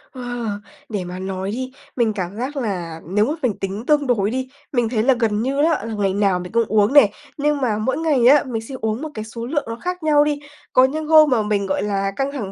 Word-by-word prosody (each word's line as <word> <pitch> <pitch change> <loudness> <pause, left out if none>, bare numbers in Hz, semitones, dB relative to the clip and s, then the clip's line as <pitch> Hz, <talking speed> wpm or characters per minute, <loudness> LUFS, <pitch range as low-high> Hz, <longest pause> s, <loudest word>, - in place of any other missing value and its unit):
Wow! 245 -2 -4 0.4
Để 205 -4 -2
mà 180 +1 -7
nói 190 +1 -3
đi, 255 +3 -4 0.2
mình 230 -3 +1
cảm 190 -1 -4
giác 265 +5 -4
là 175 -9 -3
nếu 210 +4 +2
mà 290 - -1
mình 235 -5 +2
tính 200 +4 -4
tương 295 -2 +2
đối 210 -4 +2
đi, 260 0 -3 0.2
mình 240 -4 +1
thấy 220 -3 0
là 265 - +5
gần 215 -3 +1
như 270 +4 0
á, 315 -8 +1
là 225 - -4
ngày 200 -2 0
nào 195 -2 +2
mình 180 0 -7
cũng 230 0 +3
uống 215 +4 +2
nè, 250 -9 +7 0.3
nhưng 290 0 0
mà 225 -5 +1
mỗi 220 +5 -1
ngày 295 -7 +3
á, 290 +3 +7
mình 235 -5 -4
sẽ 245 +4 -8
uống 220 +4 -1
một 315 - -4
cái 215 -3 -5
số 230 +1 -7
lượng 290 +3 -1
nó 230 - -4
khác 360 +6 -5
nhau 295 -1 +5
đi. 295 -1 -1 0.3
Có 255 +1 +6
những 305 +3 -3
hôm 310 -2 +7
mà 245 -4 +3
mình, 205 -1 0
gọi 190 0 -1
là, 195 -1 -1
căng 275 +1 -1
thẳng 215 -9 -5
230 Hz, 260 wpm, -21 LUFS, 205-275 Hz, 0.4 s, nè